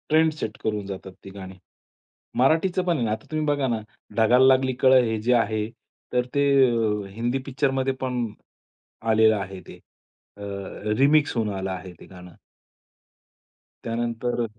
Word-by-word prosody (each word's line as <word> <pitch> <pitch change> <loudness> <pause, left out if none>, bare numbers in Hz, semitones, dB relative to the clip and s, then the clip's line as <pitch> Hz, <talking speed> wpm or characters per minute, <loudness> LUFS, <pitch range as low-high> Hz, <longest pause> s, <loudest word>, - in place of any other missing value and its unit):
Trend 160 +1 +4
set 110 -8 -5
करून 105 -2 -2
जातात 95 -1 -7
ती - - -9
गाणी. 95 -1 -10 0.8
मराठीचं 165 +7 +2
पण 175 -2 +1
आहे 120 - 0
ना, 110 - -1
आता 110 - -4
तुम्ही 155 0 -1
बघा 145 -2 +1
ना, 115 -3 -1 0.4
ढगाला 120 +3 +5
लागली 130 0 +4
कळं 130 -1 +6
हे 110 -1 -1
जे 125 +3 +2
आहे 110 -2 +1 0.4
तर, 125 0 +2
ते 140 0 +3 0.2
अ, 110 -3 0
हिंदी 120 +3 -1
पिक्चरमध्ये 135 -1 0
पण 125 -2 -1 0.9
आलेलं 110 0 +5
आहे. 95 -1 -6
ते - - -11 0.6
अ, 100 - -11 0.6
रिमिक्स 145 +1 +3
होऊन 110 -2 0
आलं 95 0 -3
आहे 95 0 -6
ते - - -13
गाणं. 90 -2 -13 1.5
त्यानंतर 120 +1 -2
120 Hz, 150 wpm, -24 LUFS, 105-135 Hz, 1.5 s, कळं